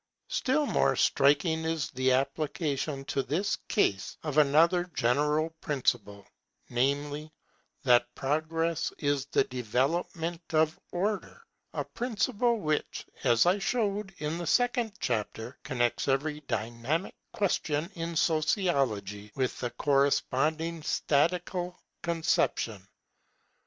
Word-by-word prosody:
Still 290 +3 +1
more - - +2
striking 150 +4 +3
is 160 -3 -1
the 130 0 +1
application 140 +1 -1
to 135 - 0
this 160 +10 0
case 100 - 0
of 155 -1 +1
another 165 +5 +4
general 150 +6 +2
principle, 105 -8 -1 0.5
namely, 145 +4 0 0.5
that 120 -2 +4
Progress 160 +3 -1
is 145 -2 0
the - - +3
development 150 +8 -1
of 155 +1 +2
Order; 205 - -2 0.3
a - - -2
principle 240 0 0
which, 155 -6 -2 0.2
as 120 -3 +4
I 180 +3 +3
showed 205 -3 -1
in 155 +3 -3
the 175 - -4
second 245 -3 +2
chapter, 115 - -3
connects 120 -4 0
every 145 +3 0
dynamical 120 - -2 0.2
question 165 -6 0
in 170 -1 -4
Sociology 140 - +1
with 130 -2 -1
the 120 - -2
corresponding 145 +5 +1
statical 175 +4 0 0.2
conception. 155 - 0
150 Hz, 105 wpm, -29 LUFS, 135-170 Hz, 0.5 s, another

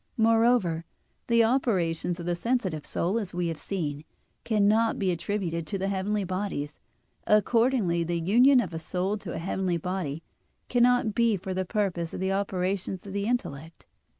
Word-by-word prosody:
Moreover, 225 -7 +3 0.4
the 230 -1 +4
operations 185 -8 0
of 170 - -6
the 175 - 0
sensitive 185 - -1
soul, 190 +7 0
as 190 -5 -6
we 175 -1 0
have 160 -2 -5
seen, 150 -7 -4 0.4
cannot 220 +1 +2
be 190 -2 +1
attributed 170 -2 -2
to 195 - -2
the 195 +1 -1
heavenly 200 +2 -1
bodies. 185 -6 -4 0.5
Accordingly, 215 -4 +3
the 170 0 -1
union 245 +10 +5
of 185 -7 -5
a 160 - -3
soul 180 +5 -2
to 190 -4 -6
a - - -4
heavenly 180 +1 -1
body 170 -3 -4 0.5
cannot 245 -2 +3
be 230 -1 +2
for 190 +1 -5
the 185 0 -1
purpose 180 -5 -2
of - - -5
the 190 +1 0
operations 190 -1 -2
of 195 - -7
the 200 0 -1
intellect. 165 - -4
190 Hz, 165 wpm, -27 LUFS, 170-220 Hz, 0.5 s, union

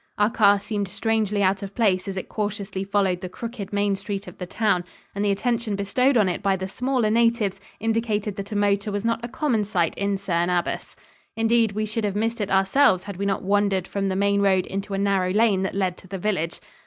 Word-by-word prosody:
Our 210 +2 +3
car 205 -4 +5
seemed 205 -1 -3
strangely 210 0 0
out 190 +1 +2
of 200 0 -7
place 195 -6 +2
as 195 -1 -4
it 190 - -4
cautiously 205 -2 -3
followed 195 -2 0
the 185 - -5
crooked 230 0 -6
main 200 -1 +1
street 195 0 -5
of 180 - -11
the 180 - -5
town, 200 -3 +1 0.3
and 200 - -2
the 205 - +2
attention 225 +1 0
bestowed 250 +7 +2
on 210 -4 +4
it 180 - -2
by 195 -1 +2
the 190 0 -4
smaller 250 +1 0
natives 230 -4 +2 0.2
indicated 220 -2 -1
that 200 +1 -6
a - - -3
motor 205 0 +1
was 205 +2 -3
not 230 0 0
a - - -2
common 255 -4 0
sight 180 -5 0
in 200 0 0
Cerne 175 -2 0
Abbas. 175 -1 -2 0.4
Indeed, 225 -1 +3
we 215 +1 -1
should 215 +1 -3
have 205 -1 -1
missed 225 +2 -1
it 205 - -2
ourselves 195 +1 +3
had 200 -2 -7
we 200 +1 -1
not 195 - -1
wandered 200 -1 +1
from 195 -1 -2
the 190 - -1
main 200 +1 +2
road 190 -2 +3
into 195 +1 -4
a - - -1
narrow 195 -2 +1
lane 210 -2 +3
that 190 - -2
led 185 -2 0
to - - -15
the 195 +1 -5
village. 175 -4 -2
200 Hz, 230 wpm, -24 LUFS, 195-215 Hz, 0.4 s, car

